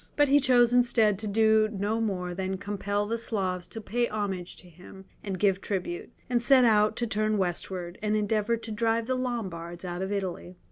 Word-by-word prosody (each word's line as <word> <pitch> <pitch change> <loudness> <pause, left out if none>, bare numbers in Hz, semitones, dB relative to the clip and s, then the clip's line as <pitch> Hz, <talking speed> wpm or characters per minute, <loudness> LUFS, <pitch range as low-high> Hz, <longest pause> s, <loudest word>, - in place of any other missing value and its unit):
But 290 -1 +3
he 285 +1 +6
chose 245 -3 +4
instead 235 -5 +3
to 215 - -3
do 220 +1 +3
no 210 +2 -1
more 180 -5 -2
than 190 +1 -3
compel 205 +1 -2
the 230 +2 -2
Slavs 190 -6 -2
to 225 - -7
pay 235 +3 -1
homage 195 -5 -3
to 180 - -8
him 180 +3 -14 0.2
and 195 -2 -3
give 195 -1 +2
tribute, 180 -3 -4 0.2
and 245 -1 +1
set 255 +1 +5
out 215 -1 +4
to 240 - -1
turn 215 -1 0
westward, 180 -1 -3
and 210 0 0
endeavour 215 +2 +1
to 225 0 -8
drive 225 +1 0
the 255 - -1
Lombards 190 -9 -4
out 175 0 -4
of 190 +1 -3
Italy. 185 -2 -4
210 Hz, 195 wpm, -28 LUFS, 190-230 Hz, 0.2 s, he